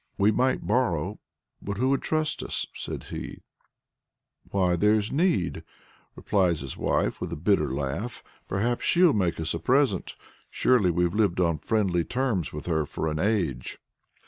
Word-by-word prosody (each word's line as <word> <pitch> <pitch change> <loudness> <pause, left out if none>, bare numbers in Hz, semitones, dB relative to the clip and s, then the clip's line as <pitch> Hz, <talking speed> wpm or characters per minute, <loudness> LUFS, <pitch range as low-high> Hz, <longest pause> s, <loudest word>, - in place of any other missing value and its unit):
"We 100 +2 +4
might 130 +4 +1
borrow, 100 -6 0 0.4
but 100 -1 -4
who 130 +4 +1
would 140 - +1
trust 155 -1 -1
us?" - - -2
says - - -6
he. - - -7 1.1
"Why 90 -3 +2
there's 105 +4 +2
Need!" 140 - +1 0.5
replies 90 -6 +1
his 70 -2 -6
wife - - 0
with - - -4
a - - -2
bitter 75 -3 +1
laugh. 70 - -3 0.2
"Perhaps 115 +5 -1
she'll 175 -2 +5
make 90 -6 0
us 80 -1 -1
a 85 - -3
present. 125 - +1 0.3
Surely 120 -8 +3
we've 90 0 +1
lived 100 -4 +1
on 85 -4 +1
friendly 95 -5 +1
terms 125 - -1
with 75 -1 -7
her 80 -3 +1
for 80 - -2
an 75 - -3
age!" 90 - -1
95 Hz, 155 wpm, -26 LUFS, 85-120 Hz, 1.1 s, she'll